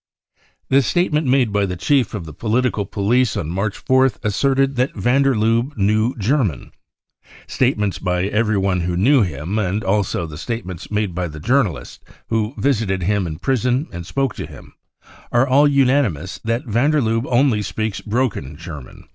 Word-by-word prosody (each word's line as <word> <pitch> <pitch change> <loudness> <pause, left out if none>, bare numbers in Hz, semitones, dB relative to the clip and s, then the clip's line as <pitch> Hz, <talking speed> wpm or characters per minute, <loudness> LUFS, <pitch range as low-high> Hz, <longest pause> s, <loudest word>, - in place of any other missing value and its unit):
* - - -39
The 135 +1 +6
statement 155 +1 +1
made 125 -5 +2
by 100 -1 +1
the 90 - -4
chief 125 +4 +1
of 95 -5 -5
the 80 - -9
political 110 - 0
police 115 +4 +1
on 80 0 -3
March 100 +3 -3
4th 130 0 +3
asserted 135 +5 +1
that 125 +2 0
van 125 +3 +2
der 135 -2 +3
Lubbe 115 +5 0
knew 110 +4 +1
German, 110 - 0 0.7
Statements 105 -7 0
by 90 -1 -1
everyone 100 -3 +1
who 85 0 -2
knew 130 +8 +4
him, 90 +3 -2
and 100 +1 -1
also 95 -3 0
the 75 -2 -9
statements 95 -6 -5
made 105 -3 -1
by 90 +1 -2
the 75 -1 -9
journalists 110 - -1 0.3
who 110 +2 -1
visited 110 -9 0
him 100 0 0
in 80 -1 -5
prison 125 - 0
and 85 -1 -7
spoke 135 -4 -1
to - - -6
him, - - -14 0.6
are 120 +3 +3
all 140 +3 +5
unanimous 130 - +1
that 115 +5 -1
van 120 +5 +1
der 155 -1 +2
Lufebe 115 0 0
only 120 -3 +3
speaks 110 +1 -3
broken 105 - -2
German. 75 -5 -10
110 Hz, 170 wpm, -20 LUFS, 95-130 Hz, 0.7 s, The